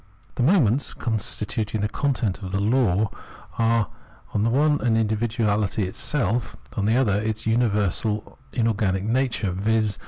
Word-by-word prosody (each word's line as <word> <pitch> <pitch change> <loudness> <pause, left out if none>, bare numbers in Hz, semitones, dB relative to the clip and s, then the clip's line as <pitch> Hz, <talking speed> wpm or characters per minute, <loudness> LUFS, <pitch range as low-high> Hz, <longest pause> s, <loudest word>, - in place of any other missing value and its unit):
The - - -3
moments 135 - +3
constituting 110 -1 -1
the 105 - +1
content 115 -5 -1
of 95 -2 -6
the 95 - 0
law 105 -2 +2 0.5
are 115 -2 +3 0.5
on 105 - +1
the 115 - +2
one 145 +4 +3
hand 115 -2 +2
individuality 110 -2 0
itself, 115 +4 -1 0.2
on 100 - -1
the 110 - +3
other 105 -6 +2
its 110 0 -3
universal 105 -2 0
inorganic 105 -5 0
nature, 115 -3 0
viz. 105 +3 0
110 Hz, 135 wpm, -24 LUFS, 105-120 Hz, 0.5 s, moments